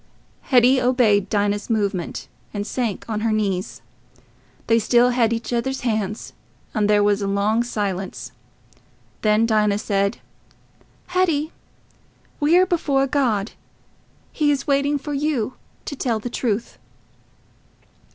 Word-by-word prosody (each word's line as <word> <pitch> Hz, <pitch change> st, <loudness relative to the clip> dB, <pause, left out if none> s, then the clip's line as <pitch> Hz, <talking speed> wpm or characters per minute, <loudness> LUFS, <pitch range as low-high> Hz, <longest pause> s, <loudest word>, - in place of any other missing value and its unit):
Hetty 255 Hz, 0 st, +4 dB
obeyed 240 Hz, -6 st, +3 dB
Dinah's 205 Hz, +1 st, 0 dB
movement, 200 Hz, -6 st, -2 dB, 0.3 s
and 205 Hz, 0 st, -2 dB
sank 230 Hz, -4 st, -3 dB
on 215 Hz, -2 st, -2 dB
her 225 Hz, +1 st, 0 dB
knees. 195 Hz, -4 st, -2 dB, 0.8 s
They 230 Hz, 0 st, +3 dB
still 240 Hz, +3 st, +4 dB
held 240 Hz, -2 st, +2 dB
each 230 Hz, +1 st, -3 dB
other's 265 Hz, +3 st, -1 dB
hands, 215 Hz, -3 st, -2 dB, 0.4 s
and 210 Hz, -2 st, +1 dB
there 205 Hz, -1 st, +4 dB
was 205 Hz, 0 st, +2 dB
long 200 Hz, +3 st, +1 dB
silence. 200 Hz, -5 st, -4 dB, 0.9 s
Then 215 Hz, +1 st, +3 dB
Dinah 210 Hz, -2 st, +2 dB
said, 200 Hz, 0 st, 0 dB, 0.9 s
"Hetty, 335 Hz, -4 st, +1 dB, 0.9 s
we 305 Hz, +4 st, +4 dB
are 370 Hz, -, +5 dB
before 290 Hz, -7 st, +1 dB
God. 245 Hz, -7 st, 0 dB, 0.8 s
He 300 Hz, -2 st, +1 dB
is 280 Hz, -2 st, 0 dB
waiting 285 Hz, 0 st, +1 dB
for 290 Hz, +1 st, -6 dB
you 275 Hz, -5 st, -1 dB, 0.3 s
to 285 Hz, -, -5 dB
tell 240 Hz, -4 st, -1 dB
the 235 Hz, +3 st, -6 dB
truth." 230 Hz, -2 st, -2 dB
230 Hz, 120 wpm, -22 LUFS, 205-265 Hz, 0.9 s, are